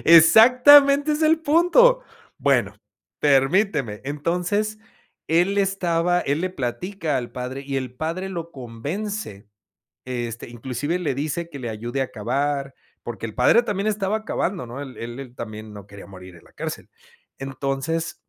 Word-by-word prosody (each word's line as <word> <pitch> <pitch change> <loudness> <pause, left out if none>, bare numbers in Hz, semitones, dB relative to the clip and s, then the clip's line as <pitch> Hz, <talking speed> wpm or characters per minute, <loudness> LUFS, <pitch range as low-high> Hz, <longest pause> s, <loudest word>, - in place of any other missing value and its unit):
Exactamente 255 - +7
es 305 +2 -1
el 320 +1 +4
punto. 360 +12 +4 0.4
Bueno, - - +1 0.5
permíteme, 140 - +2
entonces 180 +9 -1 0.5
él 180 +5 +2
estaba 180 -3 +1
él 145 +3 -1
le 185 - -1
platica 160 +2 -3
al 120 -2 -4
padre 125 +2 -5
y 135 -1 -2
el 130 -2 -4
padre 165 +7 -3
lo 170 -3 -6
convence, 130 - -6 0.6
este, 120 -3 -5
inclusive 130 +8 -3
le 155 -7 -2
dice 155 +4 -3
que 140 - -9
le 120 -3 -5
ayude 120 +5 -3
a 130 - -5
cavar 135 +5 -2 0.3
porque, 115 -1 -7
el 110 - -9
padre 175 - +4
también 205 -2 -2
estaba 215 +1 -1
cavando, 180 - -2
¿no? 125 +4 -7
Él 130 -2 -10
él 120 +2 -7
él 125 -2 -10
también, 110 -2 -8
no 100 -1 -11
quería 100 0 -12
morir 95 -2 -12
en 85 - -18
la - - -21
cárcel. 160 0 -6 0.5
Entonces 135 +4 -3
150 Hz, 150 wpm, -23 LUFS, 125-195 Hz, 0.6 s, Exactamente